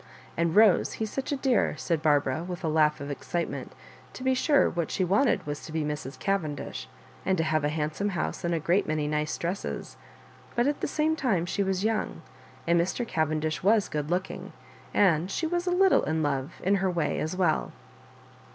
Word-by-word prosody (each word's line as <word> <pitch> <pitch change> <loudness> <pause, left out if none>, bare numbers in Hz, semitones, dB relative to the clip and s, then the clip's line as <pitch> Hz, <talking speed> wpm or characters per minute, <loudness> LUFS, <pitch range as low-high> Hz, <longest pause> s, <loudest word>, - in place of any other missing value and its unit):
And, 170 0 0
Bose, 210 -3 +5
he's 220 -1 -3
such 270 +1 -3
a - - +2
dear," 265 -3 +1
said 165 -3 -1
Barbara, 145 -1 +2
with 180 +1 -6
a - - 0
laugh 155 -1 +3
of 140 0 -4
excitement 170 +4 -4 0.4
To 255 - -8
be 260 0 +3
sure, 285 +3 +3
what 170 -1 -2
she 190 - 0
wanted 205 +9 +2
was 145 0 -5
to - - -9
be 160 -1 -1
Mrs. 150 -2 -4
Cavendish, 155 - -3 0.3
and 190 -1 +1
to 165 - +2
have 155 -1 +1
a 145 - +2
handsome 155 +6 -1
house 80 - -2
and 170 0 +1
a - - 0
great 175 +6 +1
many 155 -1 0
nice 150 0 -1
dresses; 180 +4 -4 0.6
but 240 - +2
at 290 +1 0
the - - 0
same 310 +2 +1
time 215 - +1
she 190 - -1
was 190 -1 0
young, 220 0 -1 0.4
and 170 0 +4
Mr. 230 +7 -2
Cavendish 155 -2 -1
was 205 +1 +3
good 150 -1 -3
looking, 180 +2 -3 0.4
and 180 -3 +3
she 320 - -2
was 350 +2 -1
a - - +2
little 380 +1 +5
in 160 0 0
love, 140 +1 -2
in 200 +2 +3
her 190 -1 +1
way, 165 -5 -1
as 160 +3 -2
well. 175 -5 +1
170 Hz, 200 wpm, -28 LUFS, 155-205 Hz, 0.6 s, Bose